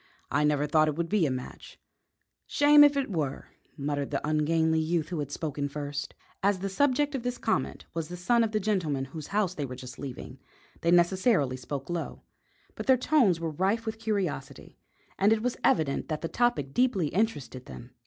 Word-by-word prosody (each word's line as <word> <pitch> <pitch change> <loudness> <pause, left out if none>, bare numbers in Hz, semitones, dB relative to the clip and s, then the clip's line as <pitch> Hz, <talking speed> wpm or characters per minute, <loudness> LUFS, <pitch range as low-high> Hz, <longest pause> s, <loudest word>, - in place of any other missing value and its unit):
"I - - +2
never 150 -1 +2
thought 155 +1 +3
it 150 - -1
would 170 +1 -2
be 195 -6 +2
a - - -1
match." 130 -1 -7 0.7
"Shame 290 0 +6
if 290 -1 +5
it 270 -6 -1
were!" 150 -7 -3 0.3
muttered 145 0 -2
the 145 +1 -2
ungainly 160 +1 +2
youth 160 -1 0
who 175 -3 -3
had 145 -1 -4
spoken 145 -2 -3
first. 145 0 -5 0.3
As 200 0 +2
the 195 +2 -3
subject 285 +7 +1
of 270 - -2
this 245 0 -3
comment 190 - -2
was 165 -1 -3
the 180 - -6
son 235 +6 +3
of 225 - -1
the 215 - +1
gentleman 175 -10 -1
whose 150 +3 -8
house 200 -3 0
they 150 - -4
were 130 -2 -5
just 125 -1 -10
leaving, 130 -1 -8 0.4
they 170 - +1
necessarily 175 - +3
spoke 135 +2 -6
low; 175 -1 -4 0.5
but - - -7
their 260 -1 +6
tones 245 - +3
were 165 -1 -3
rife 195 +8 0
with 220 0 -4
curiosity, 195 -11 -3 0.4
and 200 +2 +4
it 220 0 +2
was 250 -1 0
evident 145 -4 +2
that 155 -1 -3
the 165 - -2
topic 240 - 0
deeply 215 - +2
interested 145 - -2
them. 120 +1 -10
165 Hz, 195 wpm, -28 LUFS, 145-215 Hz, 0.7 s, Shame